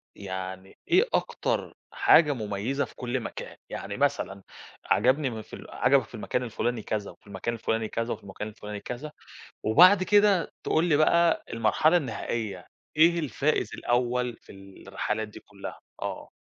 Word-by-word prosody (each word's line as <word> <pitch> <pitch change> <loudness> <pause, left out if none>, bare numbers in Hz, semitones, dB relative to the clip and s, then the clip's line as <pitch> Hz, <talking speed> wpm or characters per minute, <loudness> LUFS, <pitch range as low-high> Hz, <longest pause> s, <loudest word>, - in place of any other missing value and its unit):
يعني 95 -1 -7
إيه 370 +5 +5
أكتر - - -1 0.2
حاجة 150 -3 +5
مميزة 110 +4 -2
في - - -17
كل 125 +1 -2
مكان؟ 115 - -7
يعني - - -5
مثلًا 95 0 0 0.4
عجبني 130 +5 +3
م 110 -2 -6
في - - -18
ال - - -12
عجبك 130 0 +3
في - - -11
المكان 125 +3 -2
الفُلاني 120 0 -2
كذا 105 -2 -3
وفي - - -22
المكان 100 +4 -3
الفُلاني 115 -1 -1
كذا 115 +2 -2
وفي - - -10
المكان 100 +2 -6
الفُلاني 105 -1 -7
كذا، 125 +8 -6 0.5
وبعد 180 - +7
كده 205 -2 +4
تقول 160 +2 +2
لي 160 -4 +3
بقى 170 +2 +4
المرحلة 155 +8 +3
النهائية، 110 - -4 0.3
إيه 170 +2 +5
الفائز 145 +1 0
الأول 125 0 0
في - - -15 0.4
الرحلات 110 +1 -2
دي 105 - -12
كلّها؟ 100 -1 -9 0.2
آه. - - -5
120 Hz, 155 wpm, -27 LUFS, 105-150 Hz, 0.5 s, وبعد